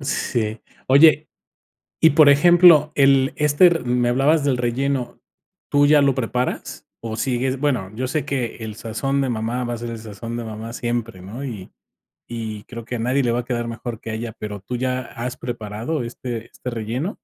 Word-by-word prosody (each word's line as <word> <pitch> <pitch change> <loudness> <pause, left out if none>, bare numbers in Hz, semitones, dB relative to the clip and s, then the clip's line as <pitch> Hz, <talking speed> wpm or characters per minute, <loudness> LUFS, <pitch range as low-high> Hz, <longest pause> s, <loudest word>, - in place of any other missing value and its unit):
Sí. 115 -5 -2 0.3
Oye, 155 +3 +5 0.7
y 160 - +6
por 150 -1 +6
ejemplo, 160 0 +6
el 135 -1 +4
este 150 +4 +5
r 170 -1 +2
me 120 0 +1
hablabas 140 +4 +3
del 135 -3 +1
relleno. 125 +2 -2 0.5
¿Tú 145 0 +4
ya 150 0 +5
lo 140 -2 +3
preparas 125 0 -3 0.2
o 110 -1 -5
sigues? 130 +2 -1
Bueno, 125 -10 -1
yo 130 +3 -2
sé 145 +1 -2
que 130 -6 -3
el 110 -2 -7
sazón 135 +5 -2
de 135 - 0
mamá 115 +2 -2
va 120 0 -3
a 120 - -4
ser 120 +1 -6
el 115 - -6
sazón 115 +2 -7
de 120 - -4
mamá 110 +1 -7
siempre, 120 -5 -3
¿no? 110 +9 -8
Y 105 -8 -7 0.5
y 110 -3 -6
creo 115 -1 -9
que 125 - -4
a 115 - -4
nadie 130 +4 +1
le 120 -2 +1
va 120 - 0
a 120 - -4
quedar 120 -2 -2
mejor 115 0 -6
que 115 - -8
a - - -3
ella, 110 0 -5
pero 105 -2 -6
¿tú 125 +5 -5
ya 130 0 -1
has 120 0 -6
preparado 120 +4 -4
este 120 -1 -6
este 125 - -7
relleno? 120 - -3
125 Hz, 200 wpm, -21 LUFS, 115-140 Hz, 0.7 s, y